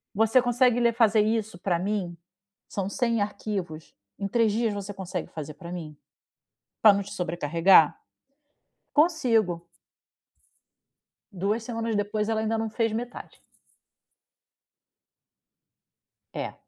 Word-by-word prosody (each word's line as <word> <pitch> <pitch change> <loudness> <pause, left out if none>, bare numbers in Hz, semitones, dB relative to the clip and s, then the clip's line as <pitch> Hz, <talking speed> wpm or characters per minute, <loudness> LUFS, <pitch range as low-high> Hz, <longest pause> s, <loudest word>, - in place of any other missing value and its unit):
Você 225 +4 +4
consegue 245 0 +2
ler 235 -1 +3
fazer 220 -2 +4
isso 220 -3 -1
pra 175 -1 -1
mim? 185 -2 -2 0.5
São 195 -1 -3
100 235 -1 0
arquivos? 200 -6 -4 0.2
Em 200 - -2
3 225 +1 +2
dias 225 +1 0
você 200 0 -6
consegue 185 -2 -5
fazer 155 -1 -8
pra 175 -1 -10
mim? 155 -4 -7 0.9
Pra 215 -2 +9
não 200 - 0
te 200 - -10
sobrecarregar? 170 -2 +3 1.0
"Consigo." 230 - +2 1.7
Duas 205 +5 -1
semanas 230 -1 -3
depois, 210 +1 -1
ela 220 -1 0
ainda 220 0 -1
não 225 - -2
fez 225 0 0
metade. 240 +3 -6 2.9
É. - - -4
210 Hz, 115 wpm, -26 LUFS, 180-225 Hz, 2.9 s, Pra